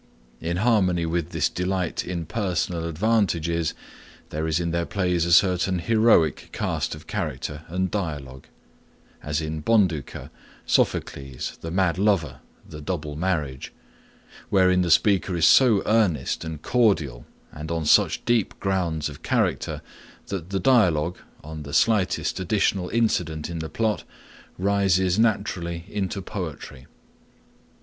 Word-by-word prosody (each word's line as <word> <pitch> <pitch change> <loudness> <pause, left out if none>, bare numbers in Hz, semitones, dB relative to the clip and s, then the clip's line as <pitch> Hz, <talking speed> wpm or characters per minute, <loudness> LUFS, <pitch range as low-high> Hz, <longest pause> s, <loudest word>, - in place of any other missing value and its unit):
In 85 +1 -2
harmony 95 -6 +2
with 80 -1 -2
this - - +1
delight 90 -1 -2
in 85 -2 -4
personal 85 -3 -2
advantages 85 -4 0 0.6
there 80 +1 -2
is 80 +1 +1
in 85 -1 -1
their 85 0 -1
plays 90 -4 0
a - - -1
certain 90 +1 +4
heroic 110 - +3
cast - - -2
of 75 - -13
character 75 +2 -4
and 90 +2 -2
dialogue,—as 75 -2 -7
in 80 0 -4
Bonduca, 90 - 0 0.3
Sophocles, 70 -2 -1
the 80 - -5
Mad 90 0 +1
Lover, 95 -9 +1 0.3
the 75 - -9
Double 75 -3 -4
Marriage,—wherein 90 +4 -2
the 90 - 0
speaker 95 +2 +3
is 80 -2 +3
so 115 -3 +6
earnest 105 - +1
and 80 -2 -7
cordial 80 - +1 0.2
and 75 +1 -8
on 85 -2 -2
such - - +3
deep 120 -3 +1
grounds 85 -6 -1
of 75 -2 -10
character, - - -1 0.5
that 95 -3 -5
the 95 0 -1
dialogue, 90 - +3 0.2
on 80 +1 -7
the 70 +1 -6
slightest 100 0 +1
additional 95 -1 0
incident 90 -9 0
in 85 - -4
the 80 0 -5
plot, 110 -1 -1 0.5
rises 95 -1 +2
naturally 85 -6 0
into 100 -1 -3
poetry. 80 -9 -7
85 Hz, 125 wpm, -24 LUFS, 80-95 Hz, 0.6 s, so